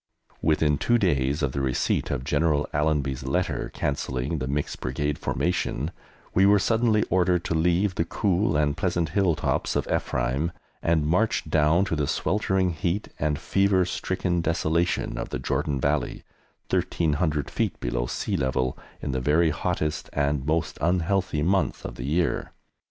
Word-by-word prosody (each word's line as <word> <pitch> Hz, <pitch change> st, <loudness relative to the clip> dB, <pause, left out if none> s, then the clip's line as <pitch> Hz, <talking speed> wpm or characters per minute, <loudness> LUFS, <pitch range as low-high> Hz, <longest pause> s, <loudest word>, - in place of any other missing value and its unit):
Within 75 Hz, -2 st, +2 dB
two 120 Hz, -, +3 dB
days 75 Hz, -, +1 dB
of 70 Hz, -, +1 dB
the 70 Hz, -, -2 dB
receipt 65 Hz, -2 st, 0 dB
of 60 Hz, -, -2 dB
General 75 Hz, +1 st, +1 dB
Allenby's 75 Hz, -3 st, 0 dB
letter 80 Hz, +8 st, -1 dB
cancelling 70 Hz, +1 st, -2 dB
the 65 Hz, -, -3 dB
mixed 70 Hz, +2 st, -2 dB
Brigade 75 Hz, +3 st, -2 dB
formation, 85 Hz, -3 st, -1 dB, 0.4 s
we 95 Hz, -, +4 dB
were 100 Hz, +1 st, +6 dB
suddenly 110 Hz, +1 st, +2 dB
ordered 90 Hz, -2 st, +2 dB
to -, -, -1 dB
leave 90 Hz, +4 st, +2 dB
the 85 Hz, -, 0 dB
cool 95 Hz, -2 st, +1 dB
and 75 Hz, -1 st, +1 dB
pleasant 85 Hz, -2 st, 0 dB
hill 95 Hz, -5 st, +2 dB
tops -, -, -1 dB
of -, -, 0 dB
Ephraim 65 Hz, +6 st, 0 dB, 0.3 s
and 80 Hz, -3 st, +2 dB
march 90 Hz, +3 st, +1 dB
down 80 Hz, +4 st, +3 dB
to 85 Hz, -, -1 dB
the 75 Hz, -2 st, 0 dB
sweltering 95 Hz, -1 st, +1 dB
heat 85 Hz, +5 st, -2 dB
and 75 Hz, -1 st, 0 dB
fever 95 Hz, +2 st, +2 dB
stricken 90 Hz, 0 st, -1 dB
desolation 85 Hz, +1 st, 0 dB
of -, -, -4 dB
the -, -, -3 dB
Jordan 70 Hz, +2 st, -1 dB
Valley, 70 Hz, -1 st, -1 dB, 0.5 s
1,300 75 Hz, -2 st, 0 dB
feet -, -, -1 dB
below -, -, -2 dB
sea -, -, -2 dB
level, 65 Hz, -1 st, 0 dB, 0.3 s
in 70 Hz, -, -1 dB
the 65 Hz, 0 st, -1 dB
very 80 Hz, +4 st, +3 dB
hottest 75 Hz, +1 st, -2 dB
and 70 Hz, -1 st, 0 dB
most 80 Hz, +1 st, 0 dB
unhealthy 90 Hz, -1 st, +1 dB
month 90 Hz, -3 st, +1 dB
of -, -, -5 dB
the -, -, -6 dB
year. 80 Hz, +2 st, 0 dB
80 Hz, 155 wpm, -26 LUFS, 70-90 Hz, 0.5 s, were